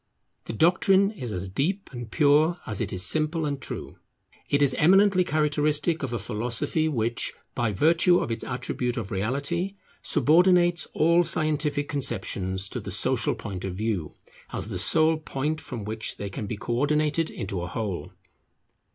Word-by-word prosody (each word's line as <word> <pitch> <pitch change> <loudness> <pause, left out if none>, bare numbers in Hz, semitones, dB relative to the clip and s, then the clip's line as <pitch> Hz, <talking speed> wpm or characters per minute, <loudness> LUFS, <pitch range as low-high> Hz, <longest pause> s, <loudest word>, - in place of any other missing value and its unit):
The - - -5
doctrine 190 - +3
is 130 - -6
as 95 -1 -4
deep 160 - -2
and 120 -2 -7
pure 155 +5 +3
as 105 -1 -3
it 105 - -2
is 90 -1 -1
simple 155 - +1
and 140 -2 -3
true. - - -6 0.5
It 145 0 +3
is 135 -2 +3
eminently 190 +3 +5
characteristic 150 0 +1
of 135 - -3
a 120 - -1
philosophy 120 +8 0
which, 120 -2 -1 0.2
by 120 -3 0
virtue 165 - +4
of 115 - -2
its 115 - -3
attribute 125 0 -3
of 110 -5 -4
reality, 140 - -2 0.3
subordinates 175 +2 +3
all 170 +3 +4
scientific 155 -3 0
conceptions 95 -9 -2
to - - -4
the - - -8
social - - +1
point 95 -2 -7
of 95 -2 -4
view, 100 -6 -3 0.4
as - - -5
the 95 -5 -3
sole 160 - +3
point 155 0 -3
from 120 -7 -7
which 110 +2 -3
they 100 -1 -5
can 105 +2 -5
be 105 - -4
co 120 - -4
ordinated 150 +3 +1
into 95 -2 -5
a 90 - -4
whole. 100 0 -4
145 Hz, 165 wpm, -26 LUFS, 110-160 Hz, 0.5 s, eminently